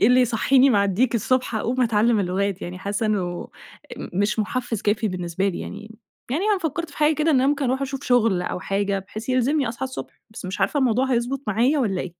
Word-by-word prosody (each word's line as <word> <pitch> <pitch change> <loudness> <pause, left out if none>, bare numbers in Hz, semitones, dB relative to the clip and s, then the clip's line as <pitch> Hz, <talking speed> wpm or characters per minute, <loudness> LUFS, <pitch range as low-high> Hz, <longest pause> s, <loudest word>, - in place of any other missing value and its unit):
إيه - - +5
اللي 250 +1 +5
هيصحيني 255 +3 +4
مع 200 -3 +3
الديك 230 +5 +1
الصبح 255 +1 0
أقوم 240 +4 -1
أتعلم 225 -1 +3
اللغات 195 +1 -1
يعني، 180 +1 -6
حاسة 205 +3 -2
إنه 180 -5 -2 0.5
ام - - -7
مش 205 +4 0
محفز 230 0 -2
كافي 215 +1 +1
بالنسبه 180 +1 -2
لي 180 - -4
يعني، 215 +2 -9 0.3
يعني 310 +9 0
أنا 420 -2 +2
فكرت 330 0 -3
في - - -15
حاجة 305 +1 +3
كده 305 +2 +1
إن 295 - +4
أنا 260 +1 +3
ممكن 285 0 +1
أروح 260 +2 0
أشوف 275 0 -4
شغل 230 -7 +3
أو - - -3
حاجة 195 0 -1
بحيث 215 +5 -8
يلزمني 255 +1 +1
أصحى 235 +3 -4
الصبح، 260 - -8
بس 215 - -10
مش 185 +1 -5
عارفة 290 - +1
الموضوع 260 0 +2
هيضبط 245 +3 0
معايا 240 +8 +2
والّا 195 -8 0
إيه؟ 175 - -6
230 Hz, 220 wpm, -23 LUFS, 200-260 Hz, 0.5 s, إيه